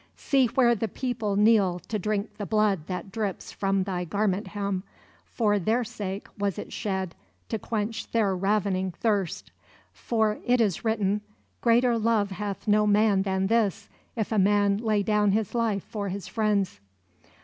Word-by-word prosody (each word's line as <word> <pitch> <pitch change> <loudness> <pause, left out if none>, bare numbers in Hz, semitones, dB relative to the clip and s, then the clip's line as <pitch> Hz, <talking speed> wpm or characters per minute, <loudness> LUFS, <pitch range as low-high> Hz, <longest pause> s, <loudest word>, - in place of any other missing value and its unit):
See 270 -3 +2
where 240 0 +3
the 225 0 -1
people 225 -2 -2
kneel 205 -4 +4
to 215 +4 -4
drink 210 +2 -2
the 205 - -4
blood 210 -7 +1
that 185 +1 -5
drips 210 -3 -3
from 195 -1 0
thy 185 -2 -2
garment 200 +3 -1
hem: 200 -2 -2 0.4
for 210 -3 +1
their 225 +6 +1
sake 200 -3 -5
was 200 -3 -1
it - - -7
shed, 190 -4 -2 0.4
to 220 - -2
quench 220 +1 -3
their 210 -4 +2
ravening 195 -1 0
thirst. 200 -3 -1 0.4
For 220 -2 0
it 250 0 +2
is 205 -7 +1
written: 210 -2 +1 0.4
'Greater 235 0 +3
love 215 -3 +1
hath 200 +2 -5
no 210 0 +4
man 205 -1 +4
than 190 -1 0
this, 220 -2 +1 0.3
if 220 -2 -2
a 215 - +2
man 200 0 +3
lay 215 -2 +1
down 210 -1 +2
his 215 -2 0
life 225 -5 0
for 205 -2 -4
his 195 +1 -5
friends.'" 205 - 0
205 Hz, 160 wpm, -26 LUFS, 195-220 Hz, 0.4 s, kneel